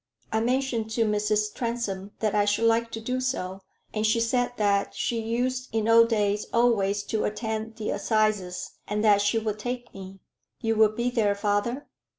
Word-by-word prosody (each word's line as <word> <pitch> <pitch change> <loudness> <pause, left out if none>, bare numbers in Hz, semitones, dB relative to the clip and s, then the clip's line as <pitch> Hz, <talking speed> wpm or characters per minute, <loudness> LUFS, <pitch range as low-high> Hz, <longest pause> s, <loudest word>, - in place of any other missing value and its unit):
"I 220 - +2
mentioned 245 -1 0
to 230 - +2
Mrs. 210 0 0
Transome 230 -5 -3
that 215 -2 +1
I 205 - +3
should 205 +2 +1
like 230 0 +3
to 225 - -3
do 250 +3 -2
so, 195 -7 -3 0.3
and 215 - -1
she 220 +1 +3
said 245 +2 +1
that 200 -1 +1
she 230 -1 -1
used 250 +3 -2
in 220 -1 0
old 230 0 +6
days 210 -2 0
always 205 -4 +2
to 220 +1 -2
attend 220 +1 -3
the 220 -1 -3
assizes, 210 -3 0 0.2
and 210 +1 -1
that 205 -2 +5
she 205 +3 +2
would 215 -1 -2
take 245 +2 -5
me. 190 0 -9 0.4
You 225 0 0
will 220 0 +5
be 235 +3 -2
there, 215 -5 +2
father?" 205 +6 -1
220 Hz, 180 wpm, -26 LUFS, 205-235 Hz, 0.4 s, old